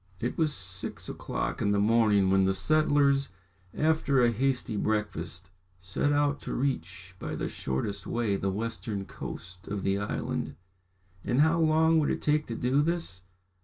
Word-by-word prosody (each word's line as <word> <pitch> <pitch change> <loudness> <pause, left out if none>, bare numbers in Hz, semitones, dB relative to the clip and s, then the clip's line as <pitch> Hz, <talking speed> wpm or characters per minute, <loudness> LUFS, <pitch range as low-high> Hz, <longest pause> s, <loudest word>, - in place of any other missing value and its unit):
It 120 - -2
was 160 -2 +2
six 90 -8 -5
o'clock - - -3
in 100 - +2
the 100 - +2
morning 105 -3 +4
when 95 0 +4
the 95 0 +2
settlers, 140 +3 +3 0.4
after 155 -2 +2
a 120 - +4
hasty 125 -1 0
breakfast, 95 -4 -2 0.3
set 95 +10 -1
out 145 0 +1
to - - -4
reach 95 - -3
by - - -4
the - - -2
shortest 100 +10 -3
way 115 -4 0
the 95 0 -1
western 110 0 -3
coast 90 -1 -8
of 100 -2 -3
the 95 0 +1
island. 105 - -3 0.7
And 125 +4 +2
how 160 +2 +4
long 160 0 +4
would 150 - +1
it - - -2
take 150 0 +2
to 115 - -4
do 130 +5 +2
this? 165 - -2
115 Hz, 165 wpm, -29 LUFS, 95-145 Hz, 0.7 s, morning